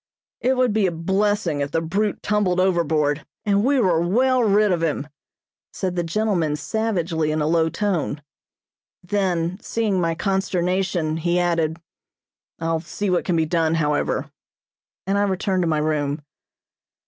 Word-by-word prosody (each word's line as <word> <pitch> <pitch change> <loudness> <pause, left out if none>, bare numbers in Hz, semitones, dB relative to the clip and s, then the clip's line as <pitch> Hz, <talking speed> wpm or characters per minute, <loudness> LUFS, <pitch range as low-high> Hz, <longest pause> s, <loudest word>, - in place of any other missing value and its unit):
"It 255 +1 +1
would 250 -4 +2
be 210 -3 +2
a - - -1
blessing 190 -1 0
if 140 - -1
the 165 - 0
brute 195 +6 -1
tumbled 205 -4 +1
overboard, 160 -5 +1 0.2
and 200 -1 +2
we 275 +2 +3
were 180 -7 +3
well 250 +8 +2
rid 210 -1 +3
of 175 -2 0
him," 150 -3 -1 0.6
said 185 -2 -3
the 175 - +1
gentleman 170 -4 0
savagely 170 -3 -1
in 155 +1 0
a 150 - +1
low 160 +1 +2
tone. 170 -7 -2 0.8
Then, 185 -2 -1
seeing 215 -6 0
my 165 -1 0
consternation, 180 -3 0
he 170 +2 0
added: 165 -2 0 0.8
"I'll 165 0 -1
see 195 +4 -3
what 180 - +1
can 180 - +1
be 160 -1 +2
done, 165 0 +1
however," 150 -2 0 0.7
and 195 +2 +1
I - - +2
returned 190 -1 0
to 175 - +1
my 155 -1 +1
room. 150 -1 -1
175 Hz, 155 wpm, -22 LUFS, 160-200 Hz, 0.8 s, we